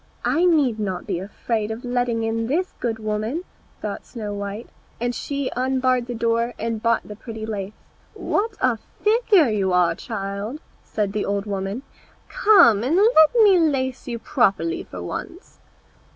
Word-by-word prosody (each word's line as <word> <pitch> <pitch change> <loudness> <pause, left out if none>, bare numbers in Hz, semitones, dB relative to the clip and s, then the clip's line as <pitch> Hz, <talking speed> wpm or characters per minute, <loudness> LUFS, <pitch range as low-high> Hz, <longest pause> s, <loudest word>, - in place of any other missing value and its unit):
"I 340 +2 +2
need 285 -10 +3
not 190 -4 -3
be 170 - -2
afraid 215 +3 -3
of 225 +3 -6
letting 245 -2 0
in 225 0 -1
this 350 +8 -1
good 230 -2 -1
woman," 215 +9 -2 0.4
thought - - -4
Snow 215 -4 -6
white, 200 +2 -5 0.3
and 240 +1 -1
she 280 +1 -3
unbarred 255 -1 +1
the 245 - -4
door 230 +1 0
and 225 0 -3
bought 230 0 +1
the 210 - -8
pretty 220 0 -7
lace. 205 -2 -4 0.4
"What 425 +1 -1
a 255 -3 +2 0.3
figure 420 - +4
you 195 -3 0
are, 175 -2 +4
child!" 200 - -5 0.2
said 205 -2 -2
the 210 - -1
old 200 0 -1
woman, 200 +4 -3 0.5
"come 375 - +5
and 275 +7 +1
let 395 -4 +5
me 390 -4 +6
lace 265 -5 0
you 235 -1 -3
properly 255 - +1
for - - -8
once." 355 +4 -7
235 Hz, 160 wpm, -22 LUFS, 210-280 Hz, 0.5 s, me